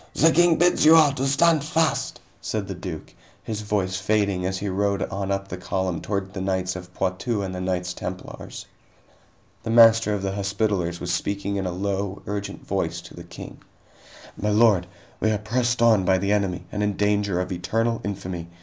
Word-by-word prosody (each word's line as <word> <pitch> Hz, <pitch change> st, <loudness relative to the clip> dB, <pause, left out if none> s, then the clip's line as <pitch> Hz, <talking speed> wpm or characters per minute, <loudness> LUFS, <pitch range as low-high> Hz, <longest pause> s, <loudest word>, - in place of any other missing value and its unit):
The 165 Hz, +2 st, +5 dB
King 175 Hz, 0 st, +5 dB
bids 175 Hz, +2 st, +3 dB
you 160 Hz, +1 st, +8 dB
all 155 Hz, -3 st, +6 dB
to 135 Hz, 0 st, -2 dB
stand 150 Hz, +2 st, +3 dB
fast," 160 Hz, +1 st, 0 dB, 0.2 s
said 105 Hz, -3 st, -3 dB
the 95 Hz, -, -4 dB
duke, 90 Hz, -3 st, -7 dB, 0.3 s
his 110 Hz, -1 st, -4 dB
voice 100 Hz, -3 st, -1 dB
fading 100 Hz, -2 st, 0 dB
as 95 Hz, 0 st, -2 dB
he 100 Hz, -, -4 dB
rode 100 Hz, +1 st, 0 dB
on 100 Hz, 0 st, -4 dB
up 100 Hz, 0 st, -2 dB
the 90 Hz, -, -6 dB
column 90 Hz, -2 st, -2 dB
toward 100 Hz, -2 st, -3 dB
the 95 Hz, -, -4 dB
knights 95 Hz, -1 st, -1 dB
of 90 Hz, 0 st, -9 dB
Poitou 100 Hz, +3 st, -1 dB
and 95 Hz, -1 st, -4 dB
the 90 Hz, -, -4 dB
Knights 90 Hz, -1 st, -2 dB
Templars. 90 Hz, +1 st, -7 dB, 1.0 s
The -, -, -6 dB
Master 115 Hz, -2 st, +6 dB
of 100 Hz, -, -4 dB
the 95 Hz, -, -1 dB
Hospitallers 100 Hz, -3 st, -1 dB
was 90 Hz, 0 st, -2 dB
speaking 100 Hz, +2 st, -2 dB
in 95 Hz, -1 st, -2 dB
a -, -, -2 dB
low, 100 Hz, +1 st, -3 dB
urgent 100 Hz, -1 st, -5 dB
voice -, -, -2 dB
to -, -, -13 dB
the -, -, -10 dB
King: -, -, -10 dB, 0.8 s
"My 105 Hz, -, -2 dB
lord, 105 Hz, -4 st, +4 dB, 0.3 s
we 110 Hz, -, +1 dB
are 110 Hz, -, +1 dB
pressed 120 Hz, +3 st, 0 dB
on 110 Hz, -4 st, +5 dB
by 95 Hz, +1 st, +3 dB
the 100 Hz, +2 st, -1 dB
enemy 95 Hz, -4 st, 0 dB
and 105 Hz, -, -3 dB
in 105 Hz, -1 st, 0 dB
danger 105 Hz, -3 st, +1 dB
of 90 Hz, +1 st, -3 dB
eternal 115 Hz, +6 st, -1 dB
infamy. 90 Hz, -4 st, -5 dB
100 Hz, 195 wpm, -24 LUFS, 95-110 Hz, 1.0 s, you